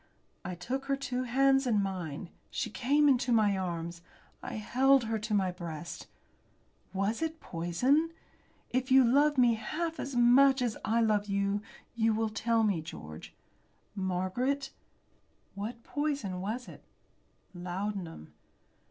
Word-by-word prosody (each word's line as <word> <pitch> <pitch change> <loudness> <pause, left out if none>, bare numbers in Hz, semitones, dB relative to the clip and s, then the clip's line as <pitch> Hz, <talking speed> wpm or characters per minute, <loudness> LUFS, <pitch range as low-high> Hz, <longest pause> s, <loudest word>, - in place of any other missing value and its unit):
I 180 - -4
took 255 +10 -4
her 275 0 +1
two 255 -2 -3
hands 270 +2 +3
in 220 -4 +3
mine. 180 -4 -4 0.2
She 225 - -3
came 285 +6 +3
into 255 -2 +3
my 215 -3 +4
arms. 170 -2 -4 0.4
I - - -6
held 260 +5 +3
her 225 -1 -1
to 215 +1 -3
my 190 -2 +2
breast. 170 -2 -7 0.8
"Was 200 +6 -1
it 320 0 -2
poison? 250 - +1 0.6
If 255 +1 0
you 260 0 +7
love 285 +4 +4
me 245 -2 +5
half 320 +9 -3
as 275 -1 -4
much 265 +3 +6
as 235 -3 -1
I 230 +3 +2
love 210 -2 +2
you 200 0 0 0.3
you 225 -1 +2
will 220 0 0
tell 225 +1 +1
me, 200 -7 +1
George." 80 - -9 0.6
"Margaret!" 200 +9 -1 0.8
"What 225 +4 -6
poison 280 -12 -2
was 225 +6 -4
it?" - - -12 0.7
"Laudanum!" 180 - -5
225 Hz, 135 wpm, -31 LUFS, 190-265 Hz, 0.8 s, you